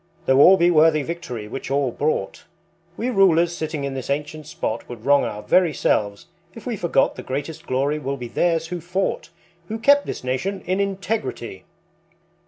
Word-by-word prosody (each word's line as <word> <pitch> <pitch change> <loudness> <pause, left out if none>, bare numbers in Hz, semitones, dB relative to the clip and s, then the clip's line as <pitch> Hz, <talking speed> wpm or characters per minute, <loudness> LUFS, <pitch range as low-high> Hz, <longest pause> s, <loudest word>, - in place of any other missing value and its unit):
Though 130 +1 +4
all 190 +6 +8
be 175 0 +4
worthy 155 -2 +4
Victory 125 -9 -6
which 130 +5 -6
all 135 -2 +1
bought, 145 -8 -2 0.5
We 245 +3 -1
rulers 175 -5 +4
sitting 155 -3 -4
in 140 -1 -3
this 130 -1 -6
ancient 150 +1 -3
spot 110 - -4
Would 115 -2 -9
wrong 140 0 +4
our 105 0 -5
very 175 -5 +3
selves 100 -3 0 0.3
if 230 - -11
we 245 -3 -2
forgot 175 -8 +1
The - - -5
greatest 145 +4 -5
glory 140 +4 0
will 140 -1 -3
be 125 -2 -6
theirs 165 +4 0
who 175 -1 -4
fought, 180 +1 -2 0.4
Who 220 - -4
kept 285 +5 +4
this - - -5
nation 175 +11 -2
in 185 +2 0
integrity." 195 - -3
155 Hz, 180 wpm, -22 LUFS, 130-180 Hz, 0.5 s, all